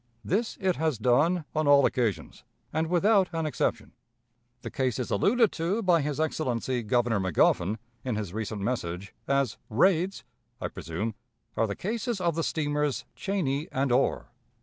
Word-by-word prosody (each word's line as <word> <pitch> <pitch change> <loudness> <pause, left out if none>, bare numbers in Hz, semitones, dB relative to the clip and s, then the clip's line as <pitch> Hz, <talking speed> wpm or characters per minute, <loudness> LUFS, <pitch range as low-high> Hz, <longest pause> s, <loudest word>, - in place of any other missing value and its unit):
This 220 +6 0
it 185 -2 +1
has 155 -5 0
done 145 +9 +2
on 155 -1 0
all 140 -1 +7
occasions, 115 -6 -1 0.3
and 160 +1 0
without 190 +3 +3
an 165 -1 -1
exception. 150 - -1 0.7
The - - -5
cases 130 -5 -1
alluded 220 - +3
to 185 +7 -1
by 175 -4 +4
his 150 0 -2
Excellency, 130 -5 -1
Governor 115 -1 +1
Magoffin, 95 +2 +2 0.3
in 125 -4 -2
his 105 -4 -4
recent 105 -2 -4
message, 100 -5 -3
as 140 -4 +1
'raids,' 180 - +2 0.4
I - - -3
presume, 95 +5 -4 0.4
are 115 - +2
the 100 - -3
cases 230 +2 -2
of 170 -2 +1
the 165 - -1
steamers 145 -4 -1
Cheney 160 -7 -1
and 135 0 0
Orr. 125 -1 +1
140 Hz, 150 wpm, -28 LUFS, 115-170 Hz, 0.7 s, all